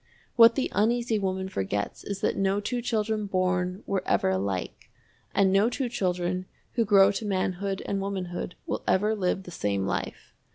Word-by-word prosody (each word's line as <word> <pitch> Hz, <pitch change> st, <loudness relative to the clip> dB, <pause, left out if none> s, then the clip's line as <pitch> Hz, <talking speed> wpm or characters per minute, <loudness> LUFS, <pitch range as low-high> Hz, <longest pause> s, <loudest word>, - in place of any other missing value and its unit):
What 230 Hz, 0 st, +8 dB
the 270 Hz, -, -1 dB
Uneasy 230 Hz, +2 st, +1 dB
Woman 190 Hz, -1 st, -2 dB
forgets 100 Hz, -, -3 dB
is 200 Hz, 0 st, -5 dB
that -, -, +1 dB
no 195 Hz, +1 st, +1 dB
two 240 Hz, +4 st, -2 dB
children 220 Hz, -2 st, -1 dB
born 185 Hz, 0 st, 0 dB
were 195 Hz, -2 st, -1 dB
ever -, -, +2 dB
alike, 95 Hz, -1 st, -3 dB, 0.5 s
and 195 Hz, -1 st, +4 dB
no 200 Hz, +4 st, +4 dB
two 250 Hz, 0 st, -2 dB
children 180 Hz, -4 st, -1 dB, 0.2 s
who 235 Hz, -, +1 dB
grow 200 Hz, -1 st, +6 dB
to 205 Hz, -, -4 dB
manhood 195 Hz, -1 st, -1 dB
and 195 Hz, -1 st, -1 dB
womanhood 185 Hz, -3 st, -4 dB
will -, -, -3 dB
ever 210 Hz, +3 st, +3 dB
live 190 Hz, -2 st, -1 dB
the 180 Hz, -, -10 dB
same 100 Hz, -, -1 dB
life. 95 Hz, -, -4 dB
195 Hz, 170 wpm, -27 LUFS, 180-210 Hz, 0.5 s, What